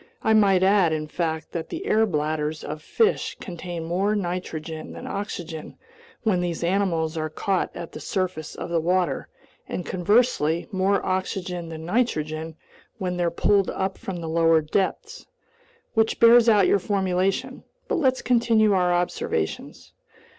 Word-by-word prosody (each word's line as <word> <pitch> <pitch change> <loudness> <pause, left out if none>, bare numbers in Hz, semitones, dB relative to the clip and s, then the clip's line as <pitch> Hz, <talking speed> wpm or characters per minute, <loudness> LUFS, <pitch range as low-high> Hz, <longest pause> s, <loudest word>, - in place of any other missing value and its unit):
I 220 - +3
might 195 -4 +4
add, 190 -3 +4
in 155 -1 -2
fact, 160 0 -3
that 165 -1 -5
the 345 +4 -5
air 220 - +3
bladders 155 -2 -2
of 150 +1 -6
fish 440 - 0
contain 175 -3 -6
more 190 +6 0
nitrogen 175 -4 -4
than - - -8
oxygen 175 -6 -6 0.5
when 195 -6 +2
these 170 -1 -2
animals 170 -3 0
are 155 0 -2
caught 190 +4 -1
at 170 -1 -7
the - - -8
surface 175 -1 -3
of - - -6
the 170 - +2
water, 180 +2 0 0.4
and 180 - -4
conversely, 180 -4 +2
more 195 0 +1
oxygen 185 -2 -2
than 160 0 -7
nitrogen 160 -7 -1 0.4
when 180 -1 -3
they're 175 -1 +1
pulled 200 +2 +2
up 190 0 -2
from 180 -3 -5
the 165 - -5
lower 165 0 +4
depths. 195 - -2 0.7
Which 220 0 +1
bears 235 0 +7
out 205 -4 +5
your 200 - +3
formulation. 195 +6 -1 0.2
But - - 0
let's 260 -4 +1
continue 230 -4 +3
our 180 -2 +2
observations." 175 - -2
180 Hz, 150 wpm, -24 LUFS, 160-200 Hz, 0.7 s, bears